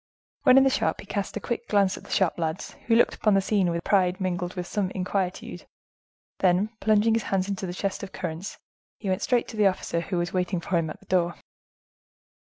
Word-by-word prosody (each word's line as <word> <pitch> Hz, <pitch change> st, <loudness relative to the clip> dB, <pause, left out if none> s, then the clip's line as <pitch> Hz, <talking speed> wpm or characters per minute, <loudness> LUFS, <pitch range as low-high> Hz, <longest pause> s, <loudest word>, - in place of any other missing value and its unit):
When 255 Hz, -, +6 dB
in 270 Hz, -, +8 dB
the 270 Hz, -, +3 dB
shop, -, -, 0 dB
he -, -, -9 dB
cast 200 Hz, +1 st, -3 dB
a -, -, -3 dB
quick 235 Hz, +2 st, -4 dB
glance 200 Hz, -2 st, +3 dB
at -, -, -11 dB
the -, -, -15 dB
shop 185 Hz, -3 st, +1 dB
lads, 160 Hz, +2 st, -3 dB, 0.2 s
who 230 Hz, -, +4 dB
looked 235 Hz, -, +4 dB
upon 215 Hz, -2 st, +2 dB
the -, -, +5 dB
scene 195 Hz, -2 st, +1 dB
with 170 Hz, -, -1 dB
a -, -, -4 dB
pride 185 Hz, -2 st, +2 dB
mingled 180 Hz, -1 st, -2 dB
with 180 Hz, -1 st, -3 dB
some 195 Hz, 0 st, -1 dB
inquietude; 185 Hz, 0 st, -3 dB, 0.7 s
then 185 Hz, +3 st, +3 dB
plunging 215 Hz, +1 st, +3 dB
his 225 Hz, -, +2 dB
hands 190 Hz, -1 st, +1 dB
into 195 Hz, -1 st, -3 dB
a -, -, -4 dB
chest 195 Hz, +1 st, -3 dB
of 195 Hz, -, -7 dB
currants, 175 Hz, +1 st, -5 dB, 0.4 s
he 200 Hz, -, -4 dB
went 185 Hz, 0 st, 0 dB
straight 245 Hz, -4 st, +1 dB
to 225 Hz, -, -8 dB
the 210 Hz, -1 st, +5 dB
officer 185 Hz, -3 st, -1 dB
who 180 Hz, +1 st, -3 dB
was 175 Hz, 0 st, -2 dB
waiting 180 Hz, 0 st, 0 dB
for 175 Hz, +2 st, -3 dB
him 165 Hz, -2 st, 0 dB
at -, -, -8 dB
the -, -, -19 dB
door. 175 Hz, -2 st, +1 dB
190 Hz, 230 wpm, -26 LUFS, 180-205 Hz, 0.7 s, in